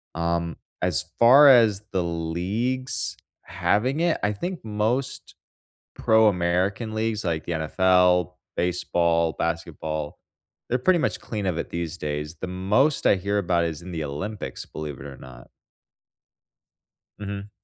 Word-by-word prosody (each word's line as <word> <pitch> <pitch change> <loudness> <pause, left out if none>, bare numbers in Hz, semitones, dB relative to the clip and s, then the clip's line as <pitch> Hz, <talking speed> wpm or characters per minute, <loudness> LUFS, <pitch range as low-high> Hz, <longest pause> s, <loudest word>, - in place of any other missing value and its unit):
Um, 85 0 -1 0.2
as - - 0
far 130 +5 +8
as 110 -6 +5
the 95 -2 0
leagues 90 +11 -2 0.3
having 130 +8 0
it, 170 -1 +2
I 105 - +2
think 175 - -5
most 110 +5 -2 0.6
pro 110 0 +4
American 95 +4 0
leagues 110 -1 -1
like 80 -3 -1
the - - -4
NFL, 90 +2 +3 0.2
baseball, 85 -2 +1
basketball, 80 -2 -3 0.5
they're 125 - +2
pretty 180 +7 +3
much - - -1
clean 105 -3 -5
of 90 -3 -1
it - - -3
these 85 -1 -4
days, 75 +1 -4
the - - -3
most 100 +11 +1
I - - +5
hear 100 +2 -2
about 85 -3 +1
is 80 -1 -4
in 90 - -9
the 80 -2 -3
Olympics, 95 +9 -5
believe 75 -3 -7
it 65 - -8
or 70 -2 -9
not. 65 -1 -13 1.7
Mhm. 100 0 -6
90 Hz, 140 wpm, -24 LUFS, 85-110 Hz, 1.7 s, far